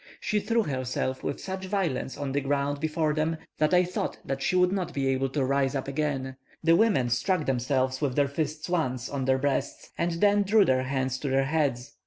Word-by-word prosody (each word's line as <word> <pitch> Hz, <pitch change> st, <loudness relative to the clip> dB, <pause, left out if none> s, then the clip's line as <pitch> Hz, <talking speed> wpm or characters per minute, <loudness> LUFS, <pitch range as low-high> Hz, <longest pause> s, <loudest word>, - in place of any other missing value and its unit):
She 210 Hz, -, 0 dB
threw 230 Hz, +2 st, +1 dB
herself 130 Hz, -2 st, -2 dB
with -, -, -3 dB
such 190 Hz, 0 st, -5 dB
violence 185 Hz, -10 st, -2 dB
on 140 Hz, -2 st, -3 dB
the 140 Hz, +1 st, 0 dB
ground 140 Hz, +1 st, -1 dB
before 155 Hz, 0 st, 0 dB
them, 160 Hz, +1 st, 0 dB, 0.2 s
that 155 Hz, 0 st, +3 dB
I 180 Hz, 0 st, +5 dB
thought 180 Hz, +1 st, -3 dB, 0.2 s
she 160 Hz, -, 0 dB
would 180 Hz, 0 st, +4 dB
not 185 Hz, -3 st, -2 dB
be 135 Hz, -1 st, 0 dB
able 135 Hz, 0 st, 0 dB
to 135 Hz, 0 st, 0 dB
rise 140 Hz, 0 st, +1 dB
up 135 Hz, -, -2 dB
again; 135 Hz, -2 st, -2 dB, 0.3 s
the 165 Hz, +1 st, +5 dB
women 180 Hz, -, +3 dB
struck 155 Hz, -, +1 dB
themselves 130 Hz, +1 st, 0 dB
with 135 Hz, -4 st, 0 dB
their 145 Hz, -1 st, +3 dB
fists 155 Hz, +2 st, -3 dB
once 130 Hz, -8 st, -1 dB
on 140 Hz, -2 st, -2 dB
their 130 Hz, 0 st, +3 dB
breasts, 140 Hz, 0 st, -2 dB
and 170 Hz, 0 st, +1 dB
then 205 Hz, +4 st, +3 dB
drew 205 Hz, +1 st, +4 dB
their 130 Hz, 0 st, +2 dB
hands 130 Hz, -1 st, -1 dB
to 140 Hz, -, -3 dB
their 135 Hz, +1 st, +2 dB
heads. 140 Hz, -3 st, -1 dB
145 Hz, 210 wpm, -27 LUFS, 130-170 Hz, 0.3 s, I